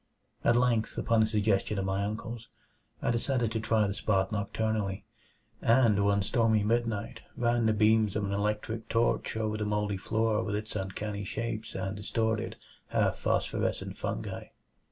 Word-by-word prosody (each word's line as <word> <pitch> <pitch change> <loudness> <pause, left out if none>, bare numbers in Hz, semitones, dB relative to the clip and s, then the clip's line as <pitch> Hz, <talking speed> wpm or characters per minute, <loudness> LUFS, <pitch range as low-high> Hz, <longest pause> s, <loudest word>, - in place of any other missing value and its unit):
At 120 - +4
length, 120 -3 +2
upon 115 -1 +3
a 110 - +4
suggestion 105 -1 +1
of 95 - -1
my 95 +1 0
uncle's, 110 +2 -5 0.6
I - - +2
decided 120 -1 0
to 110 - -1
try 110 -1 +2
the 100 - -1
spot 100 -1 +1
nocturnally; 105 -1 -1 0.6
and 115 -4 +4
one 100 -1 +3
stormy 110 0 +2
midnight 115 -1 -1 0.2
ran 120 -1 +2
the 110 - +3
beams 110 -1 +3
of 105 - 0
an 100 - -2
electric 105 +2 -2
torch 115 -1 +1
over 110 -1 -1
the 105 - -2
moldy 105 -1 0
floor 110 +2 0
with 105 -2 -2
its 110 +1 -5
uncanny 100 +1 -3
shapes 115 +2 -4
and 95 +1 -3
distorted, 110 +2 -1 0.3
half - - +1
phosphorescent - - -1
fungi. - - -4
110 Hz, 155 wpm, -30 LUFS, 100-115 Hz, 0.6 s, At